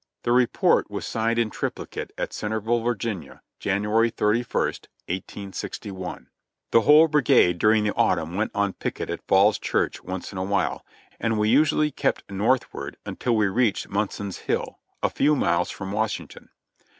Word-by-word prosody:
The 120 - 0
report 125 0 +3
was - - -5
signed 115 +1 0
in 115 -2 +1
triplicate - - -5
at - - -3
Centerville, 110 +2 -1
Va., 120 0 +1
Janu 105 -1 -3 0.8
ary 115 +1 +5
31, 110 +2 +1 0.6
1861.* 95 0 -6 0.5
The 115 - +6
whole 150 +7 +7
brigade 120 - +4
during 105 +2 +4
the 105 - 0
autumn 85 -1 +1
went 105 +3 0
on 100 -2 +1
picket - - -4
at - - -4
Falls 100 +2 +4
Church - - -1
once 95 0 -5
in 95 - -5
a - - -1
while, 100 +1 -1 0.4
and 115 -1 0
we 105 0 +2
usually 150 +3 +3
kept - - -2
northward 100 - -1
until 120 -2 -1
we 105 -1 +3
reached 105 +2 +1
Munson's 100 -1 -3
Hill, - - -3 0.2
a - - +3
few 150 +2 +3
miles 90 -9 +1
from 95 0 -6
Washington. 110 +1 -3
105 Hz, 155 wpm, -24 LUFS, 95-115 Hz, 0.8 s, whole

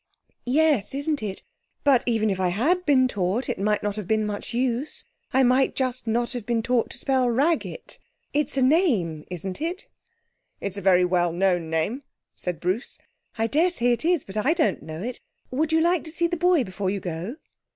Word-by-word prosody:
'Yes, 275 -3 +2
isn't 285 +1 -1
it? 200 -3 -5 0.4
But 275 -4 +5
even 220 -3 +2
if 190 - -2
I 185 - +2
had 320 - +1
been 260 -3 +5
taught, 200 +2 -1
it - - -3
might 210 +1 +1
not 205 -1 -1
have 210 -4 -5
been 215 0 +1
much 205 -1 -4
use. 250 +3 -2 0.3
I 265 0 +4
might 255 +2 +3
just 255 -2 -1
not 235 +2 0
have 245 -4 -5
been 230 0 0
taught 245 -1 +1
to - - -8
spell 260 -2 +1
"Raggett". 305 - -1 0.3
It's 295 -2 0
a 265 - +3
name, 245 - +2
isn't 185 - -5
it?' 345 +4 -3 0.7
'It's 200 0 -4
a - - -4
very 180 -1 +5
well 175 -1 +2
known 175 -2 +1
name,' 165 - -1 0.3
said 180 -2 -4
Bruce. 185 +8 -2 0.4
'I 225 - +1
daresay 295 -1 +2
it 240 - 0
is, 340 -3 +2
but 195 +2 -8
I 300 - +3
don't 330 -2 +1
know 160 +3 -7
it. 245 +1 -4 0.3
Would 300 +5 0
you 320 0 +4
like 345 +1 +2
to 315 - -6
see 340 +1 0
the 345 +1 0
boy 350 -3 +3
before 190 -2 -3
you 200 +1 -1
go?' 175 - -5
240 Hz, 200 wpm, -25 LUFS, 195-290 Hz, 0.7 s, But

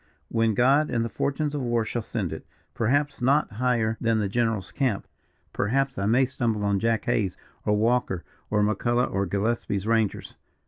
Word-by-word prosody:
"When 115 -2 +1
God 135 +6 +4
and 115 -1 0
the - - -3
fortunes 145 +6 -1
of 145 - -2
war 120 -2 0
shall 120 +2 -2
send - - -3
it. - - -7 0.3
Perhaps 140 +4 0
not 140 +3 +3
higher 115 -1 0
than 115 -1 +2
the 105 -2 0
general's 110 -2 -1
camp 130 -8 -1 0.5
perhaps 135 +6 0
I 100 - 0
may 125 +5 +4
stumble 115 -5 -1
on 100 -1 +2
Jack 115 0 0
Hays, 105 -6 0 0.3
or 105 0 +3
Walker, 110 -5 +1 0.3
or 105 0 +2
McCulloch, 120 +4 +1
or 100 0 0
Gillespie's 100 0 -1
rangers. 110 -2 0
115 Hz, 175 wpm, -26 LUFS, 105-125 Hz, 0.5 s, God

